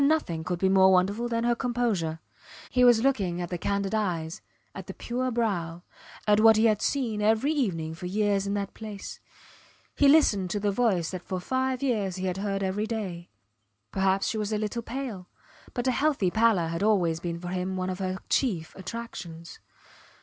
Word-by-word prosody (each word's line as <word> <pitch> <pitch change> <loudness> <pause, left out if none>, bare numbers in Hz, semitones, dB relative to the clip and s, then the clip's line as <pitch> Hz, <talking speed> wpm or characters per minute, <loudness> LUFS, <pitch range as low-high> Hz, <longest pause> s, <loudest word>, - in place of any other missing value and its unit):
And 280 - +5
nothing 230 - 0
could 175 +2 -2
be 190 - +2
more 190 0 +6
wonderful 200 +6 +2
than 230 -1 -1
her 240 0 +3
composure. 230 -10 -1 0.5
He 250 - +3
was 240 -2 +6
looking 195 -10 +1
at 175 -1 -4
the 175 - -4
candid 200 +2 -1
eyes, 175 -7 -2 0.3
at 190 -2 -8
the 190 - -7
pure 255 +2 -2
brow, 175 -8 -2 0.4
at 210 0 +4
what 220 0 +7
he 220 - +4
had 215 -2 +3
seen 235 -7 -1
every 220 +7 +3
evening 175 - -1
for 175 +2 -6
years 200 0 +1
in 200 - -1
that 200 -1 -3
place; 210 -3 -8 0.8
he 285 - +4
listened 215 - +4
to 205 - -1
the 205 0 +1
voice 195 -7 +1
that 185 -2 -5
for 185 +1 -4
five 260 +6 -1
years 210 -8 0
he 185 0 -4
had 185 0 -1
heard 195 0 -2
every 200 +3 -1
day. 190 -7 -4 0.6
Perhaps 195 0 +1
she 220 - -1
was 210 0 -2
a 215 - +1
little 215 +2 -2
pale 230 -7 -6 0.5
but 245 -1 -2
a 260 - +3
healthy 270 -10 +1
pallor 220 -7 +3
had 165 0 -3
always 185 -6 +2
been 170 -1 -4
for 175 0 -6
him 185 +1 -2
one 185 0 -2
of 185 - -6
her 185 -1 -2
chief 185 - 0
attractions. 185 -5 -8
200 Hz, 195 wpm, -27 LUFS, 180-230 Hz, 0.8 s, what